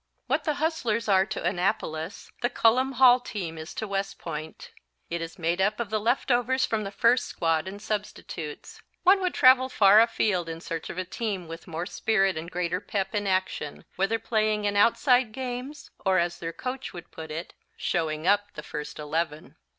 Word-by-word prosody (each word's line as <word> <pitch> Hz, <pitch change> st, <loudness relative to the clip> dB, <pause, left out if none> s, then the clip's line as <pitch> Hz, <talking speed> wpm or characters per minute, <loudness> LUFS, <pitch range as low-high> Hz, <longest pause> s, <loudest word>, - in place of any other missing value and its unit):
What -, -, 0 dB
the 305 Hz, -2 st, +1 dB
Hustlers 270 Hz, -9 st, -1 dB
are 190 Hz, -1 st, +4 dB
to -, -, -4 dB
Annapolis 175 Hz, -1 st, -2 dB
the 240 Hz, -, +2 dB
Cullom 255 Hz, +2 st, +3 dB
Hall 255 Hz, -1 st, +7 dB
team 190 Hz, -9 st, -5 dB
is 155 Hz, +1 st, -7 dB
to 220 Hz, -, -3 dB
West 195 Hz, 0 st, -2 dB
Point. 155 Hz, -1 st, -7 dB, 0.4 s
It 170 Hz, 0 st, -2 dB
is 165 Hz, 0 st, -6 dB
made 170 Hz, +2 st, 0 dB
up 205 Hz, +4 st, +1 dB
of 225 Hz, -3 st, -3 dB
the 215 Hz, -, +1 dB
leftovers 245 Hz, +3 st, +2 dB
from 220 Hz, -1 st, -1 dB
the 195 Hz, -, -4 dB
first 240 Hz, +4 st, +3 dB
squad 165 Hz, 0 st, 0 dB
and 200 Hz, +2 st, -6 dB
substitutes. 205 Hz, -7 st, -5 dB, 0.2 s
One 385 Hz, +2 st, +6 dB
would 365 Hz, -1 st, -1 dB
travel 260 Hz, 0 st, +6 dB
far 210 Hz, -3 st, +7 dB
afield 190 Hz, -6 st, +1 dB
in 165 Hz, 0 st, -5 dB
search 165 Hz, -1 st, -5 dB
of -, -, -7 dB
a 185 Hz, -, -2 dB
team 200 Hz, -5 st, -3 dB
with 165 Hz, +2 st, -9 dB
more 170 Hz, 0 st, -4 dB
spirit 195 Hz, -1 st, +1 dB
and 160 Hz, +2 st, -5 dB
greater 180 Hz, 0 st, -2 dB
pep 195 Hz, -1 st, -2 dB
in 205 Hz, -1 st, -1 dB
action, 185 Hz, -6 st, -2 dB
whether 195 Hz, +4 st, +1 dB
playing 215 Hz, -2 st, 0 dB
in 205 Hz, 0 st, 0 dB
outside 240 Hz, +2 st, +4 dB
games, 260 Hz, +3 st, -6 dB
or 190 Hz, -1 st, +3 dB
as 175 Hz, 0 st, 0 dB
their 165 Hz, -1 st, -4 dB
coach 255 Hz, +8 st, -5 dB
would 175 Hz, -, -10 dB
put 160 Hz, -1 st, -8 dB
it, 160 Hz, +3 st, -6 dB, 0.2 s
"showing 155 Hz, -2 st, -1 dB
up" 205 Hz, +1 st, +2 dB
the 150 Hz, -, -7 dB
first 150 Hz, 0 st, -6 dB
Eleven. 155 Hz, 0 st, -3 dB
200 Hz, 190 wpm, -27 LUFS, 170-230 Hz, 0.4 s, Hall